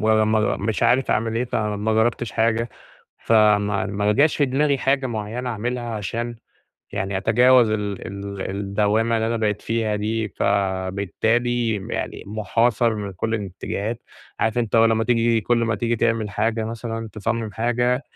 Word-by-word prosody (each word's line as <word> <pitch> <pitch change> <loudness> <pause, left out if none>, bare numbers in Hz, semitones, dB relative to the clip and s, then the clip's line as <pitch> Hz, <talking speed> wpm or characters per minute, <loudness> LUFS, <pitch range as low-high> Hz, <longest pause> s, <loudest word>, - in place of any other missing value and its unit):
ولما 110 0 +2
مش 110 0 -2
عارف 130 +1 +3
أعمل 115 +1 0
إيه، 120 - +1
فما 105 -2 -1
جربتش 110 +1 +1
حاجة، 115 +1 +1 0.5
فما 105 -2 +3
ما 105 +1 0
جاش 145 +4 +3
في 145 - +3
دماغي 140 +2 +1
حاجة 135 0 +1
معيَّنة 115 +2 -4
أعملها 120 +2 -3
عشان 115 +4 -4 0.6
يعني 95 0 -2
أتجاوز 120 +2 +5
ال 105 -2 -2
ال 100 -1 -5
الدوامة 105 +3 +1
اللي 110 0 0
أنا 115 - 0
بقيت 105 -2 -1
فيها 110 -2 -1
دي، 110 +1 -2
فبالتالي 100 +5 0 0.2
يعني - - -4
محاصر 115 +2 +1
من 100 -2 -5
كل 110 +5 -2
الاتجاهات. 105 +3 -4 0.4
عارف 110 +1 +1
أنتَ 115 -1 0
هو 115 - +6
لمّا 115 0 +2
تييجي 115 -1 +2
كل 120 +3 +1
ما 115 - 0
تييجي 115 +2 -1
تعمل 115 -2 0
حاجة 110 +2 0
مثلًا، 115 0 -5
تصمم 110 0 -2
حاجة، 120 +4 0
110 Hz, 150 wpm, -22 LUFS, 105-120 Hz, 0.6 s, هو